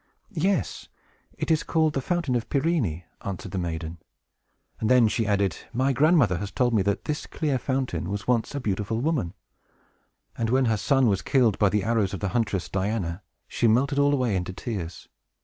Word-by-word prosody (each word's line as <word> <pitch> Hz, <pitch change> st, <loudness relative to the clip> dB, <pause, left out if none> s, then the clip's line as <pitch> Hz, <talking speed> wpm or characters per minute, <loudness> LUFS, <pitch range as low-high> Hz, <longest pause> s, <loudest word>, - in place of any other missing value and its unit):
"Yes; 185 Hz, -2 st, -1 dB, 0.5 s
it -, -, -1 dB
is 155 Hz, -, +3 dB
called 160 Hz, -2 st, +1 dB
the 135 Hz, -, -1 dB
Fountain 170 Hz, -4 st, -1 dB
of 120 Hz, -, -2 dB
Pirene," 135 Hz, -, 0 dB, 0.2 s
answered 95 Hz, -1 st, -5 dB
the 95 Hz, -, -2 dB
maiden; 80 Hz, -1 st, -4 dB, 0.8 s
and 110 Hz, -, 0 dB
then 125 Hz, -3 st, +6 dB
she 110 Hz, 0 st, 0 dB
added, 100 Hz, -4 st, +1 dB, 0.2 s
"My 130 Hz, +3 st, +2 dB
grandmother 140 Hz, -, +4 dB
has 100 Hz, -, -4 dB
told 120 Hz, +4 st, +1 dB
me 110 Hz, -, +3 dB
that 100 Hz, +1 st, -1 dB
this 150 Hz, 0 st, -3 dB
clear 145 Hz, -5 st, -1 dB
fountain 125 Hz, -, -2 dB
was 100 Hz, +1 st, -4 dB
once 125 Hz, +2 st, +1 dB
a -, -, -1 dB
beautiful 105 Hz, -1 st, -2 dB
woman; 130 Hz, -, -1 dB, 1.0 s
and 115 Hz, -1 st, -1 dB
when 130 Hz, +2 st, +3 dB
her 110 Hz, -2 st, +2 dB
son 135 Hz, +5 st, +3 dB
was 100 Hz, -4 st, +2 dB
killed 120 Hz, -7 st, +2 dB
by 105 Hz, -, +4 dB
the 105 Hz, 0 st, 0 dB
arrows 105 Hz, -3 st, +1 dB
of -, -, -6 dB
the 100 Hz, -, -1 dB
huntress 105 Hz, -5 st, -1 dB
Diana, 95 Hz, -2 st, -2 dB, 0.3 s
she 120 Hz, -, +1 dB
melted 135 Hz, +6 st, +2 dB
all 145 Hz, 0 st, +4 dB
away 125 Hz, -7 st, +1 dB
into 90 Hz, 0 st, -2 dB
tears. 90 Hz, -6 st, -6 dB
115 Hz, 185 wpm, -26 LUFS, 100-135 Hz, 1.0 s, then